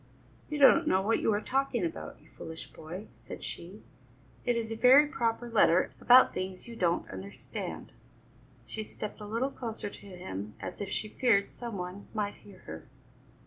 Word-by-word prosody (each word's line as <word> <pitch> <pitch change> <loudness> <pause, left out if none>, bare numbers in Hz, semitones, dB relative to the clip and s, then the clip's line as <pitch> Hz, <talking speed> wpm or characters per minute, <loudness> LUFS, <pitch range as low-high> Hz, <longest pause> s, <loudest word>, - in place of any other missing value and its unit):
"You 300 - -2
don't 305 +3 +7
know 190 +1 +3
what 225 +3 +2
you - - +2
are 205 0 +1
talking 260 -5 0
about, 165 - -6
you 150 - -22
foolish 160 0 -8
boy," 175 +6 -8 0.2
said - - -9
she; 185 +5 -7 0.6
"it 245 - +2
is 225 -1 -2
a - - -2
very 260 +6 +7
proper 240 -6 -1
letter 205 -6 +4
about 250 +1 +7
things 185 +2 -5
you 235 - -8
don't 175 -5 +1
understand." 95 +1 -7 0.7
She 215 - -5
stepped 215 0 -7
a 210 - -6
little 235 +6 -1
closer 225 -5 -5
to - - -11
him 105 - -7
as - - -6
if 200 - -3
she 215 - -2
feared 215 -3 +2
some 235 -4 -6
one 180 +2 -6
might 205 -1 -1
hear 195 -2 -16
her. 80 +1 -8
210 Hz, 180 wpm, -30 LUFS, 180-235 Hz, 0.7 s, don't